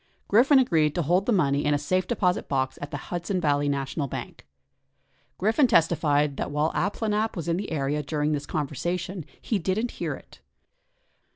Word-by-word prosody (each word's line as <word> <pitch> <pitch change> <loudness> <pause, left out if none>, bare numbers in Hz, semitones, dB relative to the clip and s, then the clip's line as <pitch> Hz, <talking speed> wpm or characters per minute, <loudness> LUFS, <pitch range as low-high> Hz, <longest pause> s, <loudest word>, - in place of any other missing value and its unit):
Griffin 255 +7 +5
agreed 160 - +3
to 175 - +1
hold 180 +6 +1
the - - +3
money 145 -8 +2
in 150 - +2
his 145 0 -1
safe 185 +3 +1
deposit 185 -6 0
box 130 -1 -1
at 145 - -5
the - - -4
Hudson 175 +2 -1
Valley 145 -3 +1
National 140 +1 -2
Bank. 95 - -7 0.9
Griffin 225 +8 +3
testified 150 - +2
that - - -2
while 150 +2 0
Abplanalp 215 +2 -1
was 170 -3 -5
in 170 0 +1
the 200 -1 -4
area 145 -1 -1
during 150 +1 -1
this 145 -1 -2
conversation, 175 +5 -3 0.2
he 215 - -1
didn't 195 +7 -1
hear - - -1
it. - - -16
165 Hz, 175 wpm, -26 LUFS, 145-195 Hz, 0.9 s, Griffin